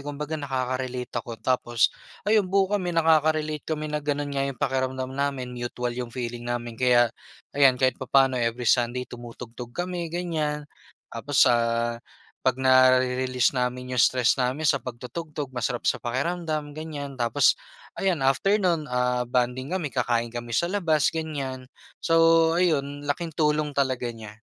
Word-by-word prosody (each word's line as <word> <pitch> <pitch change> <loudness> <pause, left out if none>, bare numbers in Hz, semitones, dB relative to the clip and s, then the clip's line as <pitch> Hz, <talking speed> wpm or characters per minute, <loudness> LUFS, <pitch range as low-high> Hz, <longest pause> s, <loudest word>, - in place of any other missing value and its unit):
Kumbaga 145 +2 -6
nakaka 130 -2 -2
relate 125 -1 -5
ako 115 0 -8
tapos 120 -2 +2 0.3
ayun, 210 -3 +3
buo 195 +1 +2
kami 190 -3 0
nakaka-relate 155 -2 +2
kami 155 -1 -3
na 150 - -1
gano'n 145 -1 -2
nga 140 0 0
yung 135 - -5
pakiramdam 130 0 -1
namin, 135 -2 -2
mutual 120 0 -3
yung 125 0 -4
feeling 120 0 -5
namin. 120 -1 -3
Kaya 120 -2 +4 0.4
ayan, 135 -2 +5
kahit 130 -1 +1
papa'no 130 -1 +3
every 115 +1 -1
Sunday 120 +1 +2
tumutugtog 120 0 -10
kami, 175 -1 -3
ganyan. 160 -3 -2 0.5
Tapos - - +3
sa - - +4 0.9
'pag 130 0 +1
nare-release 130 0 +4
namin 125 0 -2
yung 120 - +5
stress 125 -2 +3
namin 130 +4 0
sa 140 - +4
pagtutugtog 135 +4 -6
masarap 125 -1 -2
sa - - +2
pakiramdam, 150 +3 -3
ganyan. 145 -3 -6
Tapos 125 +3 +3 0.4
ayan, 185 -6 0
after 165 +11 +2
no'n, 170 -5 +1
ah, 125 -1 0
bonding 125 +4 -1
kami, 180 -5 -1
kakain 120 -3 0
kami 120 0 -7
sa 170 +9 +1
labas, 165 -6 +2
ganyan. 140 -5 -4 0.4
So, 165 0 +5
ayun, 145 -4 0
laking 165 +3 -2
tulong 150 -1 +1
talaga 130 -3 -1
niya. 110 -2 -10
130 Hz, 150 wpm, -25 LUFS, 125-155 Hz, 0.9 s, ayan